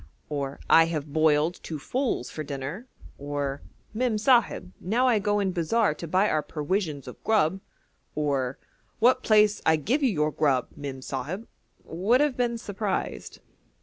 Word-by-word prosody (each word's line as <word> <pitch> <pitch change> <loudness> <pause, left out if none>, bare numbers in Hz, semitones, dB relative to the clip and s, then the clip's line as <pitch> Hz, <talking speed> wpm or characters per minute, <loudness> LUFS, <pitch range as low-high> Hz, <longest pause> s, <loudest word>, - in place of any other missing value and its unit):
'I 165 - +7
have 155 -3 -4
boiled 155 +2 +2
two 160 - -5
foals 245 - -2
for 155 - -5
dinner,' 145 - -6 0.3
or 145 -1 -3 0.3
'Mem 235 -1 0
Sahib, 225 -5 +2
now 235 +8 +1
I 235 -4 +4
go 205 0 +1
in 195 -2 0
bazaar 180 +2 +1
to 170 - -8
buy 185 +5 +3
our 155 - +1
perwisions 150 -2 -3
of 125 - -10
grub,' 195 -4 +2 0.5
or 140 -4 -1 0.4
'What 250 +3 +4
place 210 -1 +4
I 160 - +4
give 230 - 0
you 270 - +3
your 155 -6 0
grub, 140 -4 +1
Mem 135 -2 -7
Sahib?' 155 - -5 0.4
would 200 +10 +2
have 295 -3 +2
been 240 -1 0
surprised. 205 -3 -4
175 Hz, 150 wpm, -26 LUFS, 150-220 Hz, 0.5 s, I